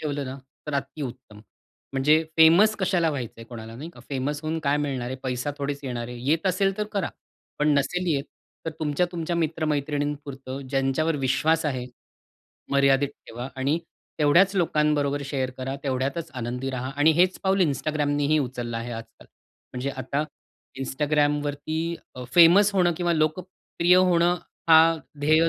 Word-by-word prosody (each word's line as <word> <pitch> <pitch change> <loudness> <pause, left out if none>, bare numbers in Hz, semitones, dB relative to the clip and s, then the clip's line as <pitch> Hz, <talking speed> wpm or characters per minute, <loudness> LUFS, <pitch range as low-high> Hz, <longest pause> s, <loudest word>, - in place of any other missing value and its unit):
ठेवलं 145 -2 -3
ना, 130 +1 -6 0.3
तर 150 - -3
अतिउत्तम. 135 -6 -5 0.5
म्हणजे 150 +4 +4
फेमस 170 +7 +6
कशाला 175 -3 +2
व्हायचं 125 -6 -4
आहे 115 - -9
कोणाला, 115 -1 -9
नाही 155 +7 -7
का? - - -13
फेमस 140 +2 -2
होऊन 160 +1 -2
काय 140 +1 +3
मिळणार 140 -4 -2
आहे. 130 +2 -4
पैसा 125 +2 -2
थोडेच 140 0 -3
येणार 120 -2 -4
आहे. 125 - -7
येत 160 +5 +2
असेल 195 +1 +1
तर 210 - 0
करा. 200 -3 -1 0.5
पण 150 - +2
नसेल 180 +6 -1
येत, 140 0 -1 0.4
तर 160 - -2
तुमच्या-तुमच्या 170 +2 -1
मित्रमैत्रिणींपुरतं 145 -4 -2
ज्यांच्यावर 135 +4 +1
विश्वास 150 +4 +1
आहे. 130 -4 -2 0.9
मर्यादित 140 0 +4 0.2
ठेवा 120 +3 -6
आणि 140 +5 +1 0.4
तेवढ्याच 170 +6 +4
लोकांबरोबर 150 -4 +1
शेअर 135 -2 -2
करा. 130 +1 -3
तेवढ्यातच 140 +4 -2
आनंदी 125 +3 -3
राहा 130 0 -4
आणि 145 +2 +5
हेच 180 +3 +3
पाऊल 190 0 +2
Instagramनेही 145 0 +1
उचललं 120 -2 -5
आहे 115 +1 -5
आजकाल. 115 -1 -10 0.5
म्हणजे 130 +2 -3
आता 135 +3 -2 0.6
Instagramवरती 145 +2 0 0.4
अ, 125 - -7
फेमस 180 +4 +7
होणं 180 -2 +3
किंवा 175 0 +1
लोकप्रिय 170 +2 +1
होणं, 175 -1 +4 0.3
हा 165 0 +7 0.2
ध्येय 155 +3 +4
145 Hz, 145 wpm, -25 LUFS, 135-165 Hz, 0.9 s, फेमस